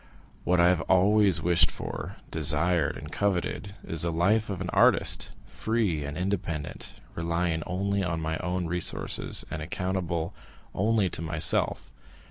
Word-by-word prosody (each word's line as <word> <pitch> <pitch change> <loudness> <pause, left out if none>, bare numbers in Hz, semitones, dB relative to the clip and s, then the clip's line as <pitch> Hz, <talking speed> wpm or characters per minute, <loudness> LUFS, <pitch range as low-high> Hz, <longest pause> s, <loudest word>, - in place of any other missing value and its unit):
What 90 0 +3
I 85 +1 +6
have 90 -2 +2
always 100 +1 +4
wished 85 -1 +4
for, - - -6 0.2
desired, 80 +1 +2
and - - -9
coveted, 100 0 -1
is 80 -1 0
the 85 - +1
life 100 +7 +2
of 95 -3 -3
an 90 -1 -4
artist, - - +3
free 110 -9 -1
and 70 +1 -5
independent, 90 -5 -3 0.2
relying 85 0 -1
only 100 +2 -1
on 85 -3 -1
my 80 0 -2
own 90 0 -2
resources, 85 +1 0
and 75 +1 -4
accountable 85 0 -2 0.4
only 105 0 +2
to - - -4
myself. 80 -1 +1
90 Hz, 140 wpm, -27 LUFS, 80-95 Hz, 0.4 s, I